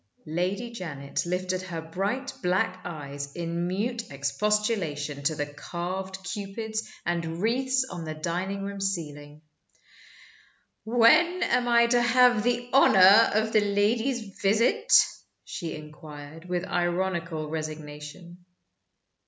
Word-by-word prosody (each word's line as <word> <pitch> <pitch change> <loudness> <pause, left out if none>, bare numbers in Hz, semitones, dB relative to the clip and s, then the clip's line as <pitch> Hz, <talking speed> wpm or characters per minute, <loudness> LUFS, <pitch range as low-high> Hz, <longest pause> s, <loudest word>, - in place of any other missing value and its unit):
Lady 185 +9 -2
Janet 155 -8 -4
lifted 185 +1 -1
her 180 -3 -5
bright 195 +11 -3
black 185 0 0
eyes 140 -3 -6
in 170 0 -2
mute 225 +6 -2
expostulation 150 -1 -1
to 155 +3 0
the 145 - -2
carved 185 +5 -6
Cupids 220 +3 -4 0.2
and 170 -1 -2
wreaths 260 +5 +1
on 175 -7 -6
the 155 -1 -5
dining 185 +5 -3
room 200 0 -5
ceiling. 150 -6 -4 1.4
"When 305 +11 +4
am 245 -6 +1
I 235 0 +5
to 240 +1 +3
have 245 -1 +5
the 245 +1 0
honor 210 -4 +7
of 220 +1 +1
the 215 - +5
lady's 215 +2 0
visit?" 230 - +2 0.5
she 170 -4 -5
inquired, 150 +1 -11
with 180 0 -1
ironical 175 -3 -1
resignation. 155 +3 -7
185 Hz, 115 wpm, -27 LUFS, 160-220 Hz, 1.4 s, honor